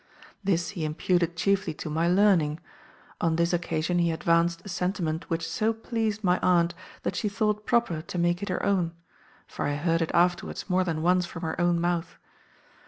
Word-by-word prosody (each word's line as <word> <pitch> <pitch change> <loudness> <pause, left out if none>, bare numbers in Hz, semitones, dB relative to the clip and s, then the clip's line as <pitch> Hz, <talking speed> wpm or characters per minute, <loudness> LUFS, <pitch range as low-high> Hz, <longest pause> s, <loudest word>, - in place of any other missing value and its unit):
This 175 -3 +1
he 180 -5 -5
imputed 170 +2 0
chiefly 195 -3 +1
to - - -6
my 160 +2 0
learning; 175 -5 +3 0.6
on 165 -1 +2
this 170 +1 +1
occasion 170 0 0
he 170 -1 +2
advanced 170 +1 +1
a - - -8
sentiment 180 -3 -2
which 165 -1 -1
so 215 +7 0
pleased 220 -2 -2
my 180 -1 +3
aunt 170 -1 +3 0.3
that - - -2
she 210 - -1
thought 210 0 -1
proper 235 -10 +1
to 170 +2 -7
make 175 +1 +1
it 200 - -4
her 185 - -1
own; 180 -4 +1 0.5
for - - -4
I 145 - -1
heard 165 +3 +1
it 165 - 0
afterwards 175 0 +1
more 185 -1 +2
than 160 -3 -2
once 180 0 +3
from 165 0 -8
her 165 +1 -2
own 175 -1 +2
mouth. 175 0 -1
175 Hz, 185 wpm, -27 LUFS, 165-190 Hz, 0.6 s, learning